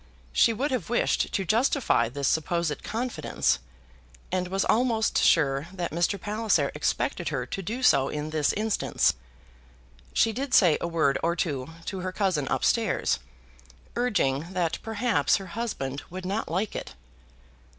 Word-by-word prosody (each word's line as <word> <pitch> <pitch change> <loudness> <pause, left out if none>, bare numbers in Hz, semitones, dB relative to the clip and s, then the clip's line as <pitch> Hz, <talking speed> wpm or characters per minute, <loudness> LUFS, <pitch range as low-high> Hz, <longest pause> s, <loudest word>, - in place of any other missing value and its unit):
She 230 - +5
would 265 +6 -1
have 245 -9 -2
wished 240 - +1
to 195 - -1
justify 225 - +2
this 140 +2 -2
supposed 160 0 0
confidence, 240 - -1 0.7
and 180 0 0
was 195 +1 0
almost 225 -1 +2
sure 140 -2 +3
that 180 -2 -4
Mr. 175 +4 0
Palliser 215 +3 +1
expected - - -1
her - - -2
to 195 - -5
do 230 +8 -4
so 135 - +4
in 150 +1 -4
this 155 -2 +2
instance. 215 0 +1 1.0
She 225 - +2
did 270 +3 -1
say 175 -6 +5
a - - -1
word 160 -5 +1
or 170 +1 +1
two 145 -6 -2 0.2
to 190 - -4
her 185 0 -3
cousin 185 -8 0
up 135 - 0
stairs, 210 - +1 0.8
urging 175 - 0
that 175 -3 -1
perhaps 225 +1 +1
her 195 - -3
husband 145 - -3
would 185 +1 -7
not 200 +4 -2
like 190 +6 -1
it. - - -6
185 Hz, 150 wpm, -27 LUFS, 155-220 Hz, 1.0 s, She